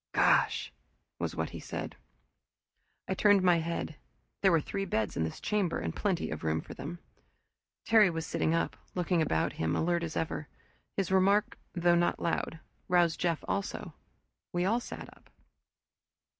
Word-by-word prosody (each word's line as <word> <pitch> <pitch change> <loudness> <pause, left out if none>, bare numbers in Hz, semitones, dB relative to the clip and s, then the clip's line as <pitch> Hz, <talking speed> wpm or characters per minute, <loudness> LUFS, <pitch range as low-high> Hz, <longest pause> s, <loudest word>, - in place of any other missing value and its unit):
"Gosh!" - - +3 0.5
was - - -2
what - - -2
he - - -7
said. - - -5 1.1
I - - 0
turned 205 -2 +4
my 175 -2 +5
head. 165 -2 -3 0.4
There 195 - +5
were 165 - +5
three 195 +6 -3
beds 110 - -1
in 80 - 0
this 80 - -4
chamber, 200 -5 0
and - - -3
plenty 195 -5 -1
of 80 - -5
room 80 0 +1
for - - -8
them. 170 +5 -6 0.9
Terry 220 -3 +6
was 165 -1 -3
sitting 160 +2 +1
up, 165 - 0 0.2
looking 180 -1 +1
about 110 - +1
him, 80 0 +1
alert 170 +1 +1
as 165 -2 -3
ever. 155 -2 -2 0.5
His 195 -2 0
remark, 195 +2 +3 0.2
though 175 0 +4
not 175 0 +2
loud, 165 -1 -1 0.3
roused 175 -2 +3
Jeff 170 -3 0
also. 200 0 -3 0.6
We 175 0 0
all 225 +5 +2
sat - - -8
up. - - -24
175 Hz, 160 wpm, -31 LUFS, 160-190 Hz, 1.1 s, Terry